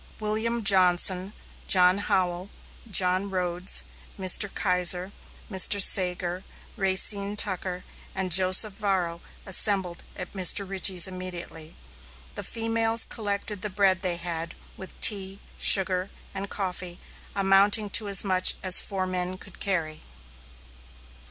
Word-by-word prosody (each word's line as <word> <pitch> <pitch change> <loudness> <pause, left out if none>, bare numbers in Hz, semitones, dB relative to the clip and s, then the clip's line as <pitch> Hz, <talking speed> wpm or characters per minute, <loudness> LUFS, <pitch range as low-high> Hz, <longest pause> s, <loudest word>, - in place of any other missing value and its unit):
William 220 +2 -4
Johnson, 185 -1 +2 0.4
John 180 +1 +3
Howell, 185 -1 -3 0.4
John 185 0 +3
Rhodes, 180 -1 -1 0.3
Mr. 190 +1 0
Keiser, 180 0 0 0.4
Mr. 195 0 +2
Sagur, 180 -1 0 0.3
Racine 200 +1 +1
Tucker, 185 -3 -3 0.3
and 190 -1 -5
Joseph 185 +3 +6
Varro 185 -5 -4 0.2
assembled 190 -2 +2
at 180 -1 -10
Mr. 195 +1 +2
Richey's 190 -2 +3
immediately. 180 -3 -9 0.6
The - - -8
females 225 0 0
collected 205 -2 -5
the 210 - -5
bread 190 -1 0
they 180 -3 -3
had, 170 -1 -7 0.2
with 190 - -14
tea, 195 -2 +3 0.2
sugar, 185 -1 +2 0.2
and 195 0 -7
coffee, 180 -3 -7 0.4
amounting 200 +2 +2
to 215 +1 +3
as 195 -2 +5
much 185 -2 +2
as 185 -1 +6
four 190 -2 -5
men 185 0 -5
could 190 -1 -17
carry. 165 -6 -4
190 Hz, 115 wpm, -24 LUFS, 180-200 Hz, 0.6 s, Joseph